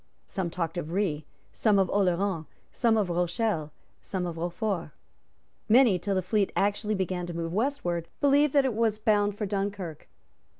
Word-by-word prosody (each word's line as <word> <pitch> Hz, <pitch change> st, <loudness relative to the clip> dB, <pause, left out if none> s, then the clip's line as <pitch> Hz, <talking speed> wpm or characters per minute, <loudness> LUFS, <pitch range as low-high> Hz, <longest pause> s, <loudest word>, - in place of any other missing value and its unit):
Some 190 Hz, -4 st, -3 dB
talked 165 Hz, 0 st, -3 dB
of 160 Hz, -1 st, -6 dB
Rhe, 170 Hz, -6 st, -1 dB, 0.3 s
some 210 Hz, -3 st, +3 dB
of 190 Hz, -1 st, +3 dB
Oleron, 185 Hz, -3 st, +1 dB, 0.2 s
some 230 Hz, -2 st, +2 dB
of 205 Hz, -3 st, +1 dB
Rochelle, 175 Hz, -2 st, 0 dB, 0.3 s
some 185 Hz, -3 st, -3 dB
of 170 Hz, -2 st, -4 dB
Rochefort. 175 Hz, +1 st, -2 dB, 0.8 s
Many, 230 Hz, -5 st, +6 dB
till 195 Hz, +3 st, -1 dB
the 185 Hz, -, 0 dB
fleet 200 Hz, +1 st, +1 dB
actually 205 Hz, +1 st, +1 dB
began 185 Hz, -2 st, -2 dB
to 175 Hz, -, -6 dB
move 165 Hz, 0 st, -3 dB
westward, 190 Hz, -, -1 dB
believed 285 Hz, 0 st, +4 dB
that 280 Hz, -2 st, +4 dB
it 260 Hz, -, +1 dB
was 220 Hz, -1 st, +1 dB
bound 205 Hz, -1 st, +2 dB
for 210 Hz, -, -2 dB
Dunkirk. 195 Hz, -5 st, -4 dB
195 Hz, 165 wpm, -28 LUFS, 175-215 Hz, 0.8 s, Many